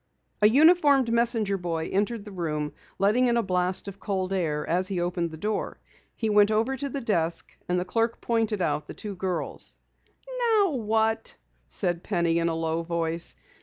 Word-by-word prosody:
A 210 - +7
uniformed 285 -3 +5
messenger 230 -4 +1
boy 165 -2 -3
entered 205 +2 0
the 210 - -9
room, 150 -5 -3 0.2
letting 215 +6 +3
in 235 0 +2
a 235 - +2
blast 185 0 0
of 200 0 -8
cold 190 -2 -2
air 155 -5 -1
as 180 +2 +2
he 190 -2 -2
opened 175 -1 -1
the 160 - -9
door. 210 +5 -3 0.4
He 225 - -2
went 210 -1 +5
over 225 +5 +1
to 280 +2 -4
the 275 +1 -4
desk 170 -7 0
and 180 0 +2
the 180 - -2
clerk 230 +4 0
pointed 225 -4 0
out 150 - -1
the - - -8
two 205 -2 -6
girls. 180 -2 -3 0.7
"Now 435 -6 +3
what?" 225 -2 0 0.3
said 175 -3 -1
Penny 170 -4 +1
in 170 0 +1
a 165 - -1
low 165 0 -1
voice. 165 0 -1
200 Hz, 180 wpm, -26 LUFS, 170-230 Hz, 0.7 s, A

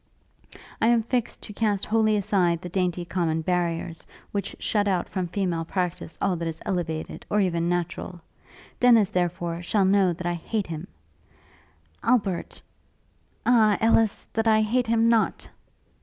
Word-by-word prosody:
'I 225 - +4
am 235 -1 +4
fixed 240 0 -2
to 210 - -6
cast 205 -2 0
wholly 215 -1 +2
aside 180 -4 +1
the 180 - -7
dainty 180 -1 -1
common 165 -3 -1
barriers, 170 -1 -2 0.2
which 200 -1 -3
shut 205 -2 0
out 185 -3 0
from 185 -2 -3
female 175 -2 -1
practice 175 -1 -3
all 195 -2 +1
that 165 0 -3
is 160 -1 -5
elevated, 165 -4 -3
or 210 - +2
even 170 -3 +1
natural. 175 0 -3 0.6
Dennis, 230 -5 +5
therefore, 175 -1 -1
shall 195 +2 +1
know 190 -1 +4
that 175 +1 -6
I 175 - 0
hate 200 +5 -3
him; 165 +2 -6 1.1
Albert... 205 -7 0 0.8
Ah, 220 -4 +4
Ellis! 225 -1 +2
that 225 0 0
I 220 0 +5
hate 245 +3 +1
him 230 0 +3
not!' 230 -1 +2
190 Hz, 150 wpm, -25 LUFS, 175-215 Hz, 1.1 s, Dennis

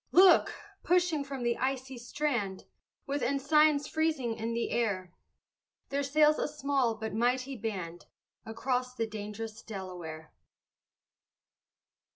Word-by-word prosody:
Look! 370 -1 +6 0.3
pushing 350 -4 +2
from 275 -2 -5
the 240 0 +1
icy 260 0 -2
strand, 235 -6 -2 0.4
With 280 0 -2
ensigns 290 +2 +3
freezing 310 -7 0
in 225 +1 -3
the 235 - -1
air, 190 -6 -1 0.8
There 280 0 0
sails 300 +2 +4
a - - 0
small 280 -5 0
but 220 -1 -5
mighty 250 +4 +1
band, 185 -7 -5 0.4
Across 250 +2 -2
the 230 - 0
dang'rous 215 +1 -6
Delaware. 180 -7 -7
250 Hz, 115 wpm, -31 LUFS, 220-285 Hz, 0.8 s, Look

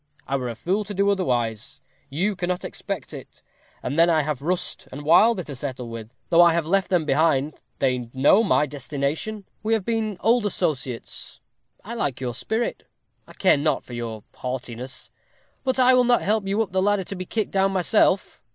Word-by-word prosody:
I 135 - -1
were 125 -2 -2
a 115 - -5
fool 185 - -1
to 205 0 -6
do 200 +1 +3
otherwise. 120 - -1 0.3
You 190 +9 0
cannot 180 0 -2
expect - - -6
it. - - -11 0.4
And 140 +6 -1
then 170 +1 +6
I 160 -2 +3
have 145 -2 -3
Rust 175 +4 -2
and 140 +3 -7
Wilder 180 +6 +5
to 145 -3 -8
settle 130 -2 -5
with. 115 -1 -8 0.2
Though 170 0 +7
I 170 -1 +6
have 170 -1 0
left 195 +3 +1
them 175 -4 +2
behind, 150 -1 +2 0.2
they 125 -3 0
know 140 - +5
my 190 -7 +3
destination. 145 - -3 0.2
We 220 +1 0
have 220 -4 0
been 220 -4 -1
old 230 -1 +3
associates. 135 - -3 0.5
I 230 - -6
like 140 - -2
your 125 -2 -3
spirit 220 - -3 0.4
I - - -13
care 185 - +4
not 155 +2 0
for 125 - -10
your 115 -3 -5
haughtiness; 125 0 -6 0.5
but 260 -1 0
I 255 0 +6
will 255 0 +5
not 245 0 +3
help 210 -1 +1
you 205 +3 +2
up 200 - -10
the 190 0 +1
ladder 205 0 +2
to 195 - -6
be 185 0 -5
kicked 220 -2 -2
down 195 0 +2
myself. 190 +1 +2
170 Hz, 195 wpm, -24 LUFS, 135-200 Hz, 0.5 s, Though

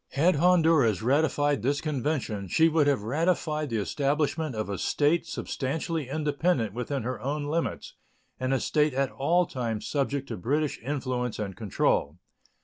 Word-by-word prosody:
Had 160 +4 +3
Honduras 160 - +4
ratified 145 0 +2
this 140 +5 +1
convention, 135 -9 -2
she 160 - +4
would 155 -2 +3
have 140 -8 +2
ratified 155 +3 0
the 115 - -1
establishment 145 +5 -1
of 110 - -2
a 100 -2 -4
state 160 +3 +1
substantially 150 +1 -3
independent 150 - 0
within 125 +2 -3
her 125 +2 -4
own 145 +3 -2
limits, 160 +3 -2 0.5
and 130 +1 -1
a 135 - +2
state 150 -1 +1
at 135 0 0
all 170 +6 +2
times 115 -7 -3
subject 140 -1 -1
to - - -4
British 145 - -1
influence 125 -2 -2
and 100 -3 -4
control. 90 -7 0
140 Hz, 150 wpm, -27 LUFS, 125-155 Hz, 0.5 s, Honduras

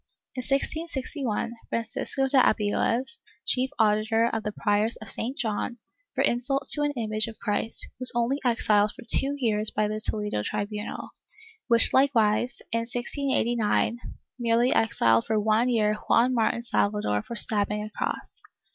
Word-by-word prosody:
In 255 - -4
1661, 275 -4 -3 0.2
Francisco 230 +4 -2
de 265 0 +3
Abiles, 235 - 0 0.3
chief 260 +1 +1
auditor 220 +1 +2
of 225 - -1
the 210 - -4
Priors 210 +2 0
of 215 -2 -7
St. 250 +7 -4
John, 225 +1 -3 0.4
for - - +1
insults 265 +3 +1
to 295 - +4
an 290 0 0
image 215 -1 +3
of 225 - -9
Christ, 225 +1 0
was 255 -1 +7
only 240 +4 0
exiled 215 -4 +2
for - - -12
two 275 +4 +3
years 215 -5 +2
by 215 0 -1
the 215 +1 -3
Toledo 210 - -1
tribunal, 210 - -5 0.6
which 235 -2 +5
likewise, 245 -3 +2
in 230 - +1
1689 240 -2 -1 0.4
merely 235 +1 +2
exiled 115 - +2
for 220 -1 +1
one 220 +3 +2
year 215 -3 +2 0.2
Juan 250 +2 +4
Martin 235 0 0
Salvador 205 - 0
for 235 - -8
stabbing 210 -1 0
a 215 - -8
cross. - - -4
230 Hz, 145 wpm, -26 LUFS, 210-250 Hz, 0.6 s, was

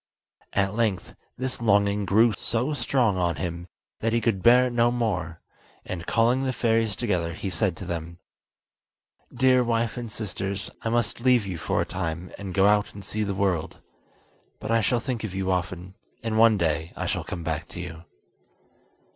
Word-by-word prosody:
At 100 0 +1
length 105 -5 -1 0.2
this 130 -1 -3
longing 100 -2 +3
grew 110 +4 +4
so 120 +9 -1
strong 120 -5 +1
on 85 -2 +1
him 85 0 -4 0.3
that 115 0 0
he 115 - +3
could 115 -5 0
bear 125 +3 +6
it 125 - -2
no 120 0 +4
more; 95 -9 -2 0.4
and, 90 -2 -5
calling 120 +3 +3
the 130 -1 0
fairies 115 -2 +1
together, 90 -8 -1
he 95 +1 -4
said 80 - 0
to - - -7
them: 85 0 -5 1.1
"Dear 130 0 +4
wife 115 -1 0
and 120 -2 -5
sisters, 100 -2 -4
I 115 - -2
must 120 -1 0
leave 125 -3 +4
you 90 -4 -4
for - - 0
a - - 0
time, 85 -1 -4
and 100 -2 -5
go 95 - +5
out 105 0 +3
and 100 -2 -9
see 110 - -2
the 100 -2 -2
world. 95 -5 0 0.8
But - - -4
I 115 0 +4
shall 120 +4 +2
think 120 -2 -3
of 100 -4 -4
you 95 -1 0
often, 90 0 -3 0.3
and 115 -1 -1
one 115 -2 +6
day 80 -1 -1
I - - -2
shall - - -1
come 85 - -6
back 80 +1 -3
to - - -9
you." 85 -2 -7
105 Hz, 185 wpm, -26 LUFS, 90-115 Hz, 1.1 s, bear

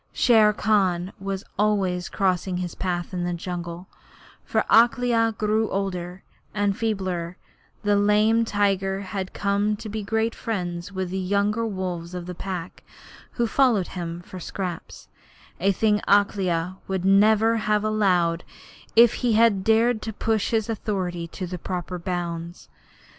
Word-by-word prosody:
Shere 220 -4 +5
Khan 195 -4 +1
was 195 0 -4 0.2
always 195 -4 +1
crossing 185 -1 0
his 180 -2 -4
path 175 -1 -3
in 180 -1 -2
the 175 0 -1
jungle, 175 0 -6 0.6
for - - 0
as 225 - +8
Akela 235 -2 +1
grew 215 +1 +1
older 185 -2 -3 0.3
and 205 -1 +1
feebler 185 -6 -2 0.5
the 205 0 +3
lame 210 +3 +3
tiger 195 -2 0
had 190 -1 -5
come 205 +1 0
to 215 - -8
be 215 +1 -4
great 220 +2 0
friends 180 -5 -4
with 185 -2 -4
the 190 - -2
younger 205 +4 0
wolves 180 -3 -4
of 175 -1 -5
the 180 - -6
Pack, 180 -1 -6 0.5
who 240 - 0
followed 230 -6 +2
him 170 -1 -5
for 185 +1 -10
scraps, 180 -1 -6 0.5
a 195 +3 +3
thing 210 +1 +1
Akela 185 -3 +1
would 190 -1 -2
never 215 +3 +4
have 210 -1 +1
allowed 180 -6 +1 0.5
if 230 0 +7
he 245 -3 +2
had 215 -3 +4
dared 225 +1 +3
to 220 - -4
push 220 0 0
his 220 -2 0
authority 185 -6 -3
to 185 +3 -6
the 180 0 -6
proper 180 0 -4
bounds. 170 -1 -5
195 Hz, 145 wpm, -24 LUFS, 180-215 Hz, 0.6 s, as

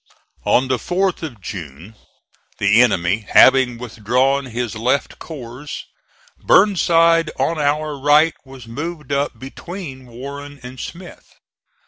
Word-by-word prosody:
On 130 +2 +3
the 130 -1 +1
4th 185 +6 -1
of 140 -9 -7
June 85 +1 -8 0.6
the 100 +4 +4
enemy 100 -2 +1
having 130 -2 +6
withdrawn 125 +4 0
his 120 -1 -3
left 125 +5 -1
corps, 135 -2 -9 0.7
Burnside 165 -4 +4
on 165 -1 0
our 150 +1 0
right 150 +4 +4
was 130 -3 -13
moved 150 +4 -6
up 140 +1 -1
between 135 -1 -9
Warren 140 +4 -9
and 125 +1 -9
Smith. 175 +1 -10
135 Hz, 115 wpm, -19 LUFS, 120-155 Hz, 0.7 s, having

